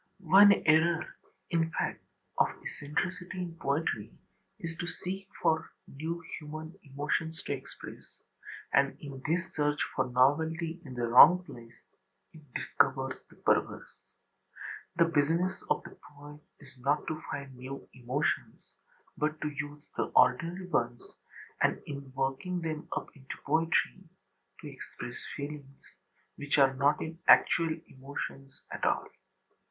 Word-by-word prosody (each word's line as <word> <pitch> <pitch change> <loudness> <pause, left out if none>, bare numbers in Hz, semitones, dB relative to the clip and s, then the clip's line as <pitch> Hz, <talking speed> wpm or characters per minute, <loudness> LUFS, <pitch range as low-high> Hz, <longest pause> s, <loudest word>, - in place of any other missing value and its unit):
One 205 +1 +10
error, 160 +2 +3 0.4
in 165 -1 +2
fact, - - -2 0.4
of - - +6 0.2
eccentricity 180 +5 -3
in 175 -2 -4
poetry 140 -7 -1 0.5
is 165 0 -5
to 170 - -3
seek 190 +2 -4 0.2
for 160 0 +2 0.2
new 165 +4 -5 0.2
human 155 +2 -7
emotions 150 +3 -2
to - - -2
express: 135 -1 -10 0.6
and 140 0 +3
in 140 -3 -8
this 170 +3 +2
search 150 -1 +1 0.2
for 130 -1 +1
novelty 160 +6 +2
in 130 -5 -9
the 120 -1 -1
wrong 180 +10 +9
place 115 -9 -12 0.6
it 160 - -13
discovers 135 0 0
the - - -18
perverse. - - -1 0.9
The 170 0 +5
business 165 +4 +1
of - - +1
the - - -11
poet 145 +1 -13 0.2
is 135 -2 -16
not 145 +4 +1
to 155 0 -4
find 140 -2 -5
new 130 +2 -8
emotions, 130 -1 -2 0.4
but 155 +1 -1
to 150 - 0
use 145 +1 -6
the - - +1
ordinary 165 +9 +3
ones 120 -6 0 0.6
and, - - +3
in 140 -2 -7
working 135 +7 -1
them 160 -1 -4
up - - -6
into 135 -2 -8
poetry, 165 +4 +1 0.5
to - - -8
express - - -8
feelings 140 -1 -7 0.6
which 145 0 0
are 135 -1 +6
not 140 +2 +3
in 160 +1 -7
actual 165 -1 +5
emotions 135 0 -7
at - - -6
all. - - +2
150 Hz, 135 wpm, -31 LUFS, 135-165 Hz, 0.9 s, One